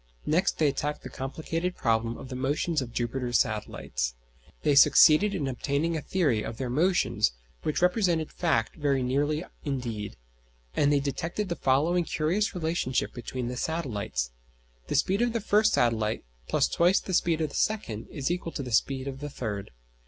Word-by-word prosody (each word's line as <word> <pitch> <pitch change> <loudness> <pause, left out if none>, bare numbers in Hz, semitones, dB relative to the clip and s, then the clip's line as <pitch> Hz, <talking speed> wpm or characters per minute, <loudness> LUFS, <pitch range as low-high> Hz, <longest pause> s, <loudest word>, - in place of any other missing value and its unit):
Next 165 +5 +2
they 155 - +3
attacked 145 +1 -2
the - - -8
complicated 165 +6 -3
problem 115 0 0
of 135 - -9
the 130 - -5
motions 145 +4 0
of 120 -2 -6
Jupiter's 120 0 0
satellites. - - -2 0.5
They 145 - +3
succeeded 160 +7 +7
in 145 -7 -1
obtaining 140 +5 -1
a 160 - -2
theory 145 - +1
of 115 - -5
their 130 -2 -3
motions 165 - +2 0.3
which 155 - -1
represented 180 -4 +2
fact 155 -10 0
very 140 -4 +1
nearly 145 +5 0 0.2
indeed, 120 -7 -3 0.6
and 145 - +3
they 145 - +4
detected 165 +8 -3
the 170 - -1
following 155 +6 +2
curious 180 +7 0
relationship 160 -6 -1
between 125 0 -5
the 125 - -4
satellites: 105 - -2 0.6
The - - -2
speed 195 +4 +2
of 240 -1 +1
the 230 - 0
first 215 0 +3
satellite 115 -2 +1 0.3
+ - - +2
twice 175 +4 +5
the 190 - -6
speed 170 -2 +2
of 155 -2 0
the - - -10
second 120 - -1
is 140 +2 -2
equal 175 -2 -3
to 140 - -3
the 125 - -6
speed 130 +4 +1
of 135 -1 -5
the 145 +1 -5
third. 105 -7 -4
145 Hz, 175 wpm, -28 LUFS, 125-170 Hz, 0.6 s, succeeded